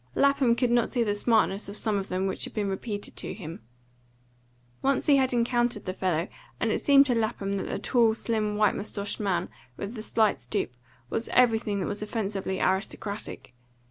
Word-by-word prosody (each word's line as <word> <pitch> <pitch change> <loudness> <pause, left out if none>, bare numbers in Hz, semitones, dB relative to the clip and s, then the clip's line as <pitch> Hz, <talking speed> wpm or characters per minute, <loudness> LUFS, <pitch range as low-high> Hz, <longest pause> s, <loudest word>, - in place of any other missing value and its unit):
Lapham 280 -4 +4
could 245 0 +1
not 240 -1 +3
see 245 -3 +1
the 205 -2 0
smartness 205 -2 +1
of 200 - -7
some 210 -2 0
of 195 - -5
them 185 +1 -1
which 190 - -1
had - - -10
been 210 -2 0
repeated 205 +1 -4
to - - -2
him. 165 - -8 1.2
Once 275 0 +1
he 285 -2 +5
had 260 -1 +2
encountered 240 -2 +1
the 185 - -2
fellow, 180 -2 0 0.3
and - - +1
it - - -1
seemed 280 -1 +7
to 255 - +1
Lapham 220 -3 -1
that 195 - -2
the - - -2
tall, 230 -3 +3
slim, 215 -2 -1
white 210 -2 +4
moustached 200 0 -2
man, 185 -4 0 0.3
with 200 +3 -5
the 220 - -6
slight 215 -7 +2
stoop, 120 0 -2 0.4
was 225 - -2
everything 225 -4 +3
that - - -1
was 205 0 -3
offensively 200 -3 -2
aristocratic. 200 - -2
215 Hz, 190 wpm, -27 LUFS, 195-235 Hz, 1.2 s, seemed